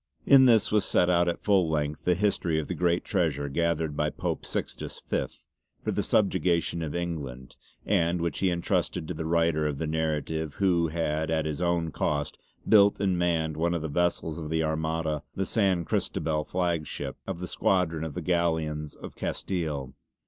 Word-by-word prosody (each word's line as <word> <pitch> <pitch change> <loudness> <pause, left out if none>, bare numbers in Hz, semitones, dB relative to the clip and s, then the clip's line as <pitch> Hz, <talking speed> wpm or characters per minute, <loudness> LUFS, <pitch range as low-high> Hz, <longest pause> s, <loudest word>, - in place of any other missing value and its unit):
In 135 -2 +8
this 115 -4 +4
was 105 -2 +3
set 90 -1 +3
out 85 0 +3
at 85 - -2
full 95 -5 +3
length 75 -1 -2
the 90 - +3
history 90 -4 +1
of 75 - -4
the - - -2
great 85 0 +1
Treasure 80 -7 0
gathered 80 0 0
by 75 +1 +1
Pope - - -4
Sixtus - - -4
Fifth - - -4 0.4
for - - -1
the - - 0
subjugation 85 -4 +1
of 80 -1 -4
England, 70 -8 -5 0.3
and 90 -3 +2
which 85 0 -2
he 95 - +2
entrusted 85 -2 -1
to 90 - -3
the 80 0 -4
writer 80 -2 +2
of 75 -2 -3
the 80 - -2
narrative 80 -1 -2
who 90 -4 +2
had 80 -1 -1
at 80 -1 0
his 75 +1 -3
own 85 -2 0
cost 75 0 -2 0.3
built 100 -2 +6
and 95 -3 +1
manned 80 -3 0
one 85 +2 +1
of 80 - -3
the 80 - -3
vessels 85 0 0
of 75 -2 -6
the 80 0 +1
Armada 80 -1 -1
the 95 - -1
San 95 -6 +1
Cristobal 75 -1 -1
flagship 85 -6 -2
of 95 -3 -4
the 90 - -4
Squadron 85 -5 +1
of 80 -3 -5
the - - -4
Galleons 80 -4 0
of - - -10
Castile. 75 -8 -3
80 Hz, 185 wpm, -27 LUFS, 75-90 Hz, 0.4 s, In